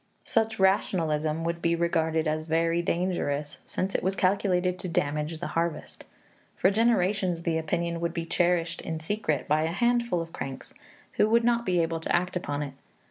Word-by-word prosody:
Such 225 -1 0
rationalism 165 -5 +1
would 170 0 -2
be 170 0 +2
regarded 160 -1 +1
as 155 0 -1
very 165 +1 +1
dangerous, 170 -5 -1
since 190 +1 -2
it - - 0
was 190 +2 0
calculated 185 -2 +1
to 180 - -4
damage 150 0 -1
the 175 - -4
harvest. 165 -1 -3 0.5
For 190 - +4
generations 200 -5 +2
the 165 -1 +1
opinion 170 +2 -2
would 170 0 -1
be 165 -1 -3
cherished 170 0 +1
in 160 -1 -4
secret 160 -4 -1
by 150 +1 +3
a 160 - +1
handful 235 -1 +1
of 165 0 -6
cranks, 135 0 -6 0.4
who 215 - +4
would 230 +1 +4
not 235 -1 +2
be 180 -1 +2
able 165 0 -2
to 160 - 0
act 180 +1 0
upon 145 -4 -2
it. 140 -2 -6
170 Hz, 180 wpm, -27 LUFS, 160-185 Hz, 0.5 s, For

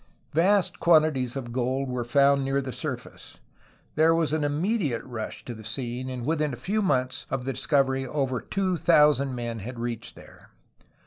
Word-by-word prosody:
Vast 185 +4 +3
quantities 155 -7 +3
of 125 -3 -5
gold 130 +2 -1
were 125 -1 -2
found 140 +3 +3
near 135 +1 0
the 130 -2 -4
surface. - - -7 0.6
There 160 +2 +4
was 165 -2 0
an 155 -1 0
immediate 150 - 0
rush 120 -4 -6
to 120 - -5
the 110 -1 -11
scene, 120 +3 -4
and 125 -2 -5
within 150 -2 0
a - - -6
few 215 +3 -1
months 130 -9 0
of 130 -2 -3
the 135 - -1
discovery 135 -1 +1
over 130 -3 -1
two 185 - -1
thousand 150 -5 +4
men 120 -2 -4
had 120 +5 -7
reached 115 -1 -5
there. - - -16
135 Hz, 175 wpm, -26 LUFS, 125-155 Hz, 0.6 s, There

